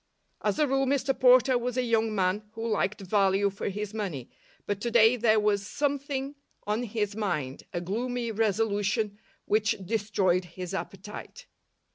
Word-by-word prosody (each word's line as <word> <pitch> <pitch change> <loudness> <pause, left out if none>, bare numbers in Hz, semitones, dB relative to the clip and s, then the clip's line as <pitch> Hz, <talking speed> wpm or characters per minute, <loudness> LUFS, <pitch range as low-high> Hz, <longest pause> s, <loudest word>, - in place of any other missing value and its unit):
As - - 0
a 300 -1 +3
rule, 270 0 +1
Mr 270 0 +1
Porter 255 0 +6
was 245 +1 -3
a 255 - +2
young 225 -2 +1
man 195 +2 0
who 225 +1 -4
liked 210 -2 0
value 195 0 +2
for 200 - -4
his 210 +1 -5
money, 185 - -4 0.3
but 205 0 -2
to 235 - -1
day 230 0 +6
there 220 -2 +3
was 205 -2 +1
something 280 0 -2 0.3
on 210 +3 0
his 210 -3 -2
mind, 150 -11 -3
a 175 - -3
gloomy 235 +5 -2
resolution 210 -1 0 0.3
which 215 0 +2
destroyed 195 -4 +1
his 180 +1 -7
appetite. 205 - -7
215 Hz, 155 wpm, -28 LUFS, 200-240 Hz, 0.3 s, Porter